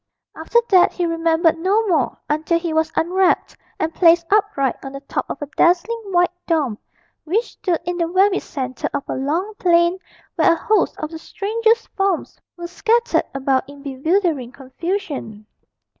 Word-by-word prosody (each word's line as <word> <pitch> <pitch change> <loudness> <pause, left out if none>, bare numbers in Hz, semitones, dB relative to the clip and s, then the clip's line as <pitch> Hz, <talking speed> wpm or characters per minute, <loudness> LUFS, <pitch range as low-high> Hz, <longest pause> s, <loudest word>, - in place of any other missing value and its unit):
After 320 +9 -1
that 370 -2 +5
he 355 - -1
remembered 330 0 +1
no 400 +6 +2
more 315 -9 +1
until 310 +3 +1
he 335 -1 -3
was 320 0 +1
unwrapped 365 +3 +1 0.2
and 320 +1 -1
placed 335 -1 +4
upright 390 - +1
on 270 0 -7
the 275 - -6
top 280 - -4
of - - -5
a - - -3
dazzling 370 +7 +2
white 355 -2 +2 0.2
dome 290 -10 0 0.4
which 420 +9 -1
stood 355 -4 -1
in 355 0 -2
the 335 -1 0
very 385 +3 +3
centre 260 -3 -4
of 280 - -2
a - - -3
long 325 +10 -2
plain, 345 +1 +3 0.4
where - - +5
a - - 0
host 410 +3 +1
of 310 0 -5
the 325 - -7
strangest 450 +6 0
forms 390 -3 -2 0.2
were 345 - -6
scattered 465 +7 +1
about 270 0 0
in 285 -1 -13
bewildering 290 -1 0
confusion. 275 - -5
335 Hz, 165 wpm, -20 LUFS, 295-380 Hz, 0.4 s, that